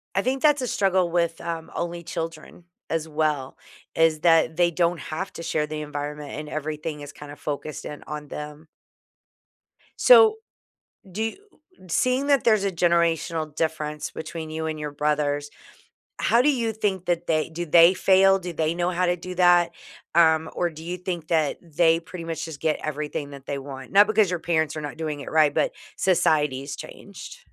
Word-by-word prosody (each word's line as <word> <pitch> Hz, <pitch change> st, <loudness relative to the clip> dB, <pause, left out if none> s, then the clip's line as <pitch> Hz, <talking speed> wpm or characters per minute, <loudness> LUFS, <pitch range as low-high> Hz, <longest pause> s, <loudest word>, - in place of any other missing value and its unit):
I 195 Hz, -, +3 dB
think 260 Hz, +3 st, -1 dB
that's 295 Hz, -3 st, +4 dB
a 250 Hz, -, -2 dB
struggle 185 Hz, -4 st, +1 dB
with, 170 Hz, -1 st, 0 dB
um, 165 Hz, -1 st, -5 dB
only 170 Hz, 0 st, -4 dB
children 165 Hz, 0 st, -6 dB, 0.2 s
as 160 Hz, -1 st, -1 dB
well 150 Hz, -3 st, -1 dB, 0.4 s
is 165 Hz, -1 st, +3 dB
that 165 Hz, -1 st, +3 dB
they 175 Hz, -1 st, +4 dB
don't 170 Hz, 0 st, +1 dB
have 185 Hz, +5 st, -5 dB
to 165 Hz, -, -8 dB
share 150 Hz, -2 st, 0 dB
the 150 Hz, 0 st, -5 dB
environment 150 Hz, 0 st, -5 dB
and 150 Hz, 0 st, -6 dB
everything 155 Hz, 0 st, -4 dB
is 145 Hz, 0 st, -9 dB
kinda 145 Hz, 0 st, -10 dB
focused 150 Hz, 0 st, -5 dB
in 150 Hz, -, -8 dB
on 150 Hz, -1 st, -6 dB
them. 150 Hz, +2 st, -8 dB, 1.3 s
So 445 Hz, -3 st, +7 dB, 0.7 s
do 210 Hz, +5 st, -3 dB
y 225 Hz, -, -2 dB, 0.5 s
seeing 255 Hz, +10 st, +1 dB
that 280 Hz, -3 st, +3 dB
there's 215 Hz, -4 st, +4 dB
a 195 Hz, -, +1 dB
generational 165 Hz, -2 st, +1 dB
difference 150 Hz, -2 st, -2 dB
between 160 Hz, -1 st, -7 dB
you 160 Hz, 0 st, -3 dB
and 155 Hz, -1 st, -3 dB
your 150 Hz, -1 st, -4 dB
brothers, 145 Hz, 0 st, -1 dB, 0.7 s
how 235 Hz, -, +4 dB
do 295 Hz, -, +3 dB
you 235 Hz, -5 st, -1 dB
think 195 Hz, -4 st, -2 dB
that 175 Hz, -1 st, -1 dB
they 155 Hz, 0 st, +1 dB
do 175 Hz, +2 st, -5 dB
they 170 Hz, +3 st, +7 dB
fail? 195 Hz, +1 st, +4 dB
Do 180 Hz, -1 st, -6 dB
they 160 Hz, 0 st, 0 dB
know 175 Hz, +1 st, 0 dB
how 180 Hz, +1 st, +1 dB
to 175 Hz, -, +2 dB
do 180 Hz, +1 st, -8 dB
that? 175 Hz, -1 st, +5 dB, 0.4 s
Um, 160 Hz, -1 st, +4 dB
or 175 Hz, -, 0 dB
do 160 Hz, 0 st, -11 dB
you 175 Hz, +2 st, -4 dB
think 175 Hz, -3 st, -5 dB
that 155 Hz, -4 st, +1 dB
they 165 Hz, 0 st, +2 dB
pretty 170 Hz, 0 st, -9 dB
much 165 Hz, 0 st, -4 dB
just 160 Hz, -3 st, -8 dB
get 155 Hz, -1 st, 0 dB
everything 150 Hz, -1 st, -4 dB
that 140 Hz, 0 st, -11 dB
they 140 Hz, -1 st, -3 dB
want? 135 Hz, -1 st, -9 dB
Not 205 Hz, +1 st, +7 dB
because 215 Hz, -3 st, +3 dB
your 180 Hz, -, -1 dB
parents 160 Hz, -2 st, 0 dB
are 155 Hz, -, -4 dB
not 145 Hz, +1 st, -6 dB
doing 155 Hz, -3 st, -3 dB
it -, -, -7 dB
right, 155 Hz, -2 st, +4 dB
but -, -, +1 dB, 0.2 s
society's 150 Hz, -6 st, +1 dB
changed. -, -, -10 dB
165 Hz, 185 wpm, -24 LUFS, 150-180 Hz, 1.3 s, So